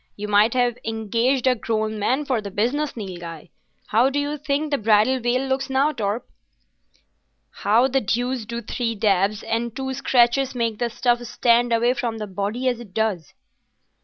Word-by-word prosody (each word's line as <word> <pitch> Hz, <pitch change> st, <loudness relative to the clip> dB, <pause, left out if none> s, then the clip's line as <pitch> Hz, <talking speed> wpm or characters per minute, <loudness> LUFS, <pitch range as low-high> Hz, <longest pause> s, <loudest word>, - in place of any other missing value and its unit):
You 210 Hz, +1 st, -5 dB
might 210 Hz, +3 st, +3 dB
have 245 Hz, -1 st, +1 dB
engaged 230 Hz, +4 st, 0 dB
a 260 Hz, -, +5 dB
grown 220 Hz, -2 st, -2 dB
man 260 Hz, +8 st, 0 dB
for 255 Hz, -5 st, 0 dB
the 200 Hz, -, -6 dB
business, 245 Hz, +9 st, -1 dB
Nilghai. 175 Hz, -5 st, -8 dB, 0.4 s
How 235 Hz, +5 st, +4 dB
do 275 Hz, -, -3 dB
you 290 Hz, +1 st, -1 dB
think 295 Hz, +1 st, -2 dB
the 285 Hz, -, +1 dB
bridal 220 Hz, +4 st, +3 dB
veil 250 Hz, +2 st, 0 dB
looks 265 Hz, 0 st, -1 dB
now, 270 Hz, +3 st, +2 dB
Torp?" 220 Hz, -3 st, -3 dB, 1.2 s
"How 230 Hz, +5 st, +2 dB
the 270 Hz, 0 st, +1 dB
deuce 245 Hz, +3 st, -1 dB
do 235 Hz, 0 st, -4 dB
three 230 Hz, +1 st, -2 dB
dabs 200 Hz, 0 st, +1 dB
and 230 Hz, +1 st, -2 dB
two 265 Hz, 0 st, -3 dB
scratches 260 Hz, 0 st, +2 dB
make 230 Hz, -3 st, -1 dB
the 240 Hz, -, 0 dB
stuff 240 Hz, +1 st, +1 dB
stand 240 Hz, 0 st, +2 dB
away 235 Hz, +2 st, +3 dB
from 240 Hz, -2 st, -3 dB
the 215 Hz, -, -4 dB
body 205 Hz, +6 st, -3 dB
as 245 Hz, -2 st, 0 dB
it 210 Hz, -6 st, -12 dB
does?" 210 Hz, -8 st, -1 dB
235 Hz, 175 wpm, -23 LUFS, 215-260 Hz, 1.2 s, a